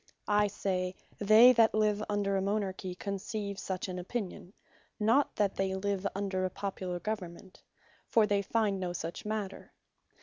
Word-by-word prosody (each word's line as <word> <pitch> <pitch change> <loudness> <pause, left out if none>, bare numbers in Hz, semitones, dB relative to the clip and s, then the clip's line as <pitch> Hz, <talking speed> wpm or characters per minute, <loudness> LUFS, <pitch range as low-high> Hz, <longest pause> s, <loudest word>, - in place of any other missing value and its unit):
I 210 0 +4
say, 185 -2 -2 0.2
they 220 +5 +8
that 225 -2 +4
live 210 -1 +2
under 200 -1 0
a 190 - +1
Monarchy 195 -2 -2
conceive 200 +1 -4
such 190 0 -3
an 180 -1 -4
opinion; 190 -1 -5 0.5
not 230 +7 +3
they 205 - +3
that 190 0 -2
live 200 0 -1
under 195 -2 -1
a 185 - +1
Popular 185 -2 -4
Government; 190 -2 -6 0.5
for 225 -2 +4
they 205 -1 +1
find 205 -1 0
no 180 -1 -2
such 165 +2 -5
matter. 210 -2 -4
200 Hz, 155 wpm, -31 LUFS, 185-210 Hz, 0.5 s, they